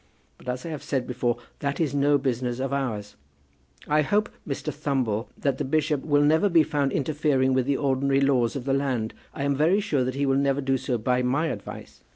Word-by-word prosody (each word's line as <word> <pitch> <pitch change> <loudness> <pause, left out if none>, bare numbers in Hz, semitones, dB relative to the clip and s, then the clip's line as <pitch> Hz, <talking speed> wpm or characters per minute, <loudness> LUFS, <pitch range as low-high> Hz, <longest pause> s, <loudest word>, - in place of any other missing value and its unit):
But, 125 - -8
as 125 +3 -3
I - - -4
have 155 -3 -5
said 130 -3 -2
before, 120 -1 -1 0.2
that 140 -1 -2
is 155 -5 0
no 145 0 +3
business 125 -2 -1
of 135 +1 -2
ours. 110 - -3 0.7
I 150 +1 +3
hope, 205 +8 +1 0.2
Mr. 140 - -3
Thumble, 130 -7 -1
that 140 -2 -1
the - - 0
bishop 150 0 0
will 145 -1 +3
never 160 +7 +4
be 165 -3 +5
found 145 -3 0
interfering 140 -2 +1
with 130 0 +1
the 140 -1 +2
ordinary 135 -1 +1
laws 130 -4 +2
of 130 -3 -4
the 135 - +1
land. 130 -5 -1 0.2
I 140 - -5
am 140 0 +1
very 165 +8 +3
sure 150 -11 0
that 130 +1 -2
he 140 +1 0
will 135 0 +2
never 140 0 +1
do 135 -1 0
so 125 -1 -1
by 125 +3 +1
my 140 +6 +1
advice. - - -8
135 Hz, 215 wpm, -25 LUFS, 130-145 Hz, 0.7 s, be